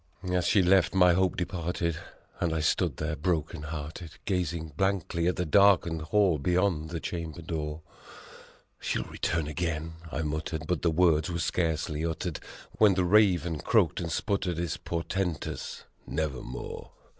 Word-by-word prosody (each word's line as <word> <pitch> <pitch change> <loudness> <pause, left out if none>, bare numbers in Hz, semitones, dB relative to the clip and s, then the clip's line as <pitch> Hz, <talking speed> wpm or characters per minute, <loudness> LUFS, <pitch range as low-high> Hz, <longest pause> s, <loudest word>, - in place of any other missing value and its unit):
9 90 -1 -3
As 90 -1 +2
she 100 - +4
left, 95 +1 +4
my 90 -2 +6
hope 95 +1 +1
departed, 85 -2 -2 0.4
and 85 -3 0
I - - 0
stood 80 - +1
there 75 0 -2
broken 80 -1 -1
hearted, 80 +1 -6
Gazing 85 -4 -1
blankly 90 -2 0
at 90 - +2
the 90 - -1
darkened 85 -2 +4
hall 90 0 +2
beyond 90 -1 +1
the 85 0 -3
chamber 85 -1 -5
door. 75 -1 -4 1.0
"She'll - - -1
return 80 -2 -2
again," 80 0 -3 0.2
I 80 - -2
muttered, 75 +1 -3
but 90 0 -1
the 85 - +3
words 80 0 +3
were 85 - -2
scarcely 80 -3 -1
uttered 85 0 -2 0.4
When 105 -3 +6
the 90 -1 +2
Raven 90 -5 +3
croaked - - +2
and 85 -1 -3
sputtered 95 -4 -1
his 85 -2 -1
por 85 -1 -3
tentous 90 -7 -3 0.2
"Nevermore!" 70 -5 -4
85 Hz, 155 wpm, -29 LUFS, 80-90 Hz, 1.0 s, my